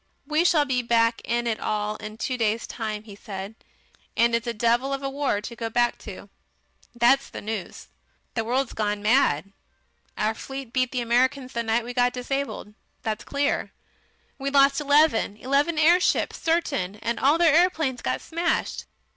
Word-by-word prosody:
"We 305 +3 +2
shall 315 -4 +4
be 255 -3 0
back 230 -1 +2
in 240 0 -1
it 225 -2 -1
all 210 0 -2
in 215 0 -8
two 255 - -2
days' 225 -1 0
time," 215 -2 -5
he 210 -2 -12
said. 195 0 -7 0.6
"And 235 0 +4
it's 230 0 0
a - - +1
devil 235 +4 +1
of 275 0 -4
a 275 - -1
war 275 -7 -1
to 235 +3 -7
go 230 -1 -4
back 240 +1 +1
to. 200 -1 -9 0.7
That's 245 +4 +3
the - - -7
news. 215 -3 -6 0.5
The 225 - -1
world's 255 +3 -1
gone 210 -1 -2
mad. 200 - +2 0.7
Our 215 +1 +1
fleet 270 +1 -8
beat 255 -1 +1
the 250 - -1
Americans 255 +3 +1
the 235 - -1
night 230 +1 0
we 245 - -6
got 245 0 +2
disabled, 255 -4 -4 0.3
that's 215 -1 -3
clear. 285 0 -1 0.7
We 275 +1 -2
lost 275 +1 +4
eleven 285 -8 +3
eleven 280 +7 +1
airships 340 +4 +3
certain, 290 - 0
and 235 +2 -3
all 290 +4 +4
their 335 -3 +4
aeroplanes 320 -7 +2
got - - -2
smashed. 340 +1 -2
245 Hz, 170 wpm, -25 LUFS, 220-275 Hz, 0.7 s, shall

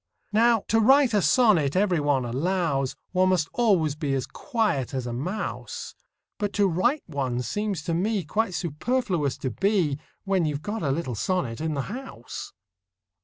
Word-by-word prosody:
Now, 230 0 +4
to 225 - +4
write 265 +2 +5
a 205 - +4
sonnet, 185 - +4
every 185 -3 +2
one 145 -3 +1
allows, 140 +1 0 0.2
One 185 0 +3
must 175 -4 +1
always 190 -11 +3
be 145 -2 -2
as 130 - -1
quiet 205 - -1
as 130 -2 -2
a 120 - -4
mouse; 180 - -4 0.5
But 205 -1 -1
to 205 - +3
write 240 - +1
one 130 -5 -2
seems 205 - -2
to 170 - -2
me 195 +3 0
Quite 200 +4 -1
superfluous 175 - -1
to 130 - -3
be, 180 - +1 0.2
When 195 -4 +1
you 150 - -1
've 145 - -6
got 215 +1 -3
a 140 - 0
little 135 -2 -1
sonnet 130 - -1
in 160 -1 -1
the 140 - -1
house. 255 - -7
175 Hz, 170 wpm, -26 LUFS, 140-210 Hz, 0.5 s, write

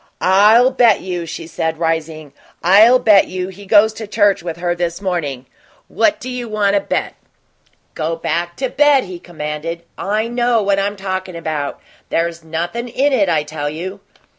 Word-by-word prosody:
"I'll 210 +7 +5
bet 240 -5 +4
you," 175 -2 -4
she 165 +1 -7
said, 160 0 -3
rising 160 -3 -3 0.3
"I'll 210 +8 +6
bet 210 -5 +4
you 185 0 -4
he 195 +1 -12
goes 215 +1 +5
to 220 -1 -8
church 205 -2 +2
with 170 -1 -6
her 175 0 -1
this 175 0 -3
morning. 160 -10 -3 0.4
What 310 -5 0
you 250 -2 -5
want 205 -2 +1
to 200 - +4
bet?" - - -3 0.8
"Go 160 +1 -2
back 170 +1 -3
to 260 -1 -2
bed," 290 0 +4
he 180 -2 -8
commanded. 165 0 -6 0.2
"I 215 +3 -1
KNOW 240 -2 +1
what 200 0 +1
I'm 200 +1 -1
talkin' 185 -2 -4
about; 155 -3 -4 0.3
there's 170 0 -2
nothin' 170 +9 -4
in 270 +4 0
it, 200 -7 +2
I 155 -3 +1
tell 150 -1 -4
you." 185 +6 -6
185 Hz, 170 wpm, -17 LUFS, 165-215 Hz, 0.8 s, I'll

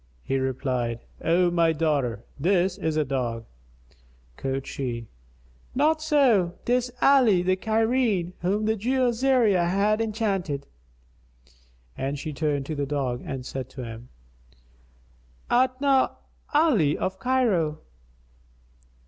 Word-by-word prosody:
He 135 - -1
replied, 125 -3 -2 0.2
"O 175 +1 +3
my 165 -1 +3
daughter, 140 -8 -1
this 180 +3 +2
is 160 -3 -1
a 155 - +2
dog." 120 -4 -2 0.9
Quoth 135 - -3
she, 120 -4 -4 0.7
"Not 310 +4 +2
so, 250 - +3
'tis 245 0 +1
Ali 245 -10 +5
the 185 +1 +2
Cairene, 220 -3 +1
whom 200 +4 0
the 220 +1 +2
Jew 250 +4 +1
Azariah 230 -7 +2
hath 205 +4 +2
enchanted;" 195 - -2 1.3
and 140 +2 -3
she 155 +1 -5
turned 145 -2 -1
to 155 - -4
the 140 -2 -2
dog 135 -4 -2
and 130 -2 -5
said 130 -1 -5
to 130 -1 -8
him, 115 +1 -9 1.4
"Art 255 +1 +2
not 275 -2 +2 0.3
Ali 265 - +3
of 190 0 -3
Cairo?" 195 -11 +1
175 Hz, 120 wpm, -25 LUFS, 140-230 Hz, 1.4 s, Ali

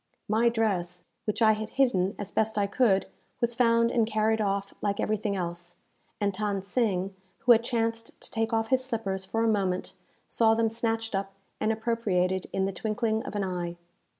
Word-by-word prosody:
My 225 +3 +3
dress, 185 -6 -1 0.2
which 215 +1 0
I 220 - +7
had 215 0 -2
hidden 225 -8 +2
as 205 -1 -5
best 220 0 0
I 205 - +3
could, 200 -2 +2 0.3
was 240 -1 +1
found 230 -1 +3
and 230 -3 +2
carried 220 0 +1
off 200 -1 -1
like 200 -1 -1
everything 215 -1 0
else; 175 -1 -4 0.4
and 200 -2 +1
Than 200 -1 -2
Sing, 195 -3 0 0.3
who 250 -2 +5
had 230 -1 +6
chanced 230 -1 -2
to - - -13
take 225 0 -1
off 225 0 0
his 260 -1 +3
slippers 200 -6 -2
for 225 +4 -1
a - - +3
moment, 195 -4 0 0.3
saw 225 -1 +3
them 225 0 +2
snatched 225 0 -1
up 195 0 -2 0.3
and 215 - +1
appropriated 210 -5 0
in 190 - 0
the 195 - -2
twinkling 220 +2 -1
of - - -6
an 205 - 0
eye. 175 -2 -3
215 Hz, 185 wpm, -28 LUFS, 195-230 Hz, 0.4 s, I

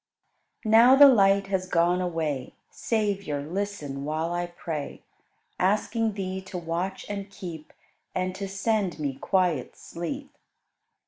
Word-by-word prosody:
22. 215 - -3
Now 255 +3 +8
the 285 +1 +10
light 200 -5 +5
has 190 -1 -2
gone 175 +1 +2
away; 160 -7 -2 0.2
Savior, 200 -10 -1
listen 170 -7 -4
while 160 +3 -2
I 175 0 -1
pray. 165 -4 -6 0.6
Asking 215 +3 +1
Thee 190 -1 -4
to 190 -1 -7
watch 175 +3 -3
and 200 -1 -5
keep 175 -6 -8 0.4
And 185 0 -1
to 195 +1 -5
send 195 -1 0
me 145 -3 -2
quiet 165 -1 0
sleep. 275 - -6
185 Hz, 130 wpm, -26 LUFS, 165-200 Hz, 0.6 s, the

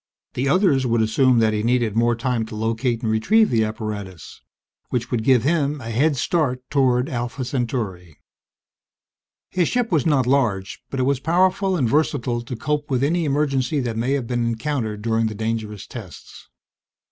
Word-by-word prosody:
The 135 +2 -1
others 155 -5 +3
would 115 -1 +2
assume 125 +3 +3
that 110 -1 +3
he 105 - 0
needed 115 -2 +1
more 120 +1 +2
time 120 0 -1
to 110 - -8
locate 115 +2 -1
and 110 - 0
retrieve 210 - +3
the 115 -2 +3
apparatus 105 -5 -6 0.5
which 120 -1 -2
would 120 -3 0
give 125 -2 +4
him 150 -1 +1
a 115 -2 -6
head 140 +5 +2
start 130 -4 0
toward 130 -2 +2
Alpha 125 +1 -4
Centauri. 110 - -3 1.3
His 180 -3 +1
ship 245 -3 -1
was 160 -5 +2
not 140 -5 +3
large, 120 -7 0
but 135 - -4
it - - +2
was 135 0 +1
powerful 185 +4 +2
and 130 -7 +1
versatile 125 -3 0
to 120 +1 -6
cope 150 +4 -2
with 130 -1 0
any 165 +3 +1
emergency 140 -1 0
that 120 -3 -3
may 120 +4 0
have 140 -4 -1
been 120 0 -1
encountered 115 -3 -3
during 115 0 +1
the 110 - -5
dangerous 110 -2 -3
tests. 105 -8 -11
125 Hz, 175 wpm, -22 LUFS, 110-140 Hz, 1.3 s, give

